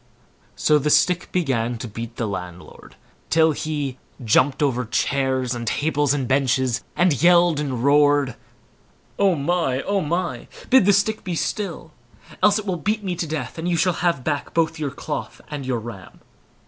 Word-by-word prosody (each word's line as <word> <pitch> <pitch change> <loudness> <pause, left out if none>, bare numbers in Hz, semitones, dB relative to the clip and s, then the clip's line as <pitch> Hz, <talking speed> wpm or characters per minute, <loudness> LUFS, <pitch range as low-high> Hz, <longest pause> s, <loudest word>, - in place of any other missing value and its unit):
So 150 -1 +3
the 150 +1 -1
stick 170 +4 +2
began 125 -9 0
to 120 - -6
beat 115 +2 -7
the 115 - -2
landlord, 90 -3 -8 0.3
till 160 0 +4
he 145 -4 -3 0.3
jumped 130 +6 +3
over 125 -3 +1
chairs, 130 +1 0
and 120 -1 -5
tables, 145 +1 +1
and 140 -3 -1
benches, 130 -2 +1
and 175 -7 +2
yelled 175 -2 +5
and 130 -5 -3
roared: 145 -2 +3 0.8
"Oh 195 -3 +4
my! 140 -3 0
oh 200 -1 0
my! 170 +3 -2 0.2
bid 260 -6 +6
the 205 - +6
stick 215 +3 +1
be 180 -3 -3
still, 170 -3 -3 0.5
else 210 0 +5
it 215 - -4
will 185 -3 -1
beat 210 +4 -1
me 185 -2 -2
to 165 - -3
death, 150 -1 -5
and 170 +2 -2
you 170 - +1
shall 180 +2 +2
have 170 -7 +1
back 145 -1 -3
both 165 -1 +1
your 150 -2 -2
cloth 145 +2 -6
and 140 -3 -5
our 125 - +1
ram." 110 -5 -10
145 Hz, 175 wpm, -22 LUFS, 130-175 Hz, 0.8 s, bid